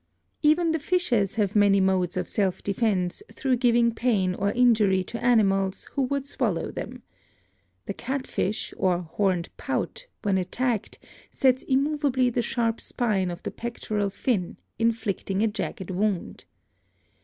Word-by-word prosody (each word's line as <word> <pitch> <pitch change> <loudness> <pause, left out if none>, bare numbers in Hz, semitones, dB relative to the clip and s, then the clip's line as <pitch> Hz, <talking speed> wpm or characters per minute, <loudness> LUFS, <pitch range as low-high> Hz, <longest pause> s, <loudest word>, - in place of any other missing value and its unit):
Even 320 +2 +4
the 320 - 0
fishes 270 - +1
have 210 -3 0
many 200 -1 +5
modes 185 -2 +1
of 185 - -1
self 195 -3 -1
defense 200 - 0
through 265 -2 0
giving 235 -1 +3
pain 210 -6 +1
or 200 +2 0
injury 215 -6 +4
to 230 +5 -7
animals 195 -5 +2
who 280 - -1
would 275 +1 0
swal 280 - 0
low - - -4
them. - - -7 0.8
The - - -3
catfish, 255 -5 -3
or 180 -2 +1
horned 180 0 -1
pout, - - -3 0.2
when 195 -3 +2
attacked 230 +4 -2 0.3
sets 260 -1 +3
immovably 275 -2 +1
the 240 - 0
sharp 230 -1 -1
spine 205 -7 0
of 175 0 -7
the - - -3
pectoral 215 -3 -3
fin, 195 -2 -1 0.2
inflict 225 -4 -1
ing 195 +2 +1
a - - +4
jagged 195 -3 -4
wound. 195 0 -2
215 Hz, 145 wpm, -26 LUFS, 190-250 Hz, 0.8 s, many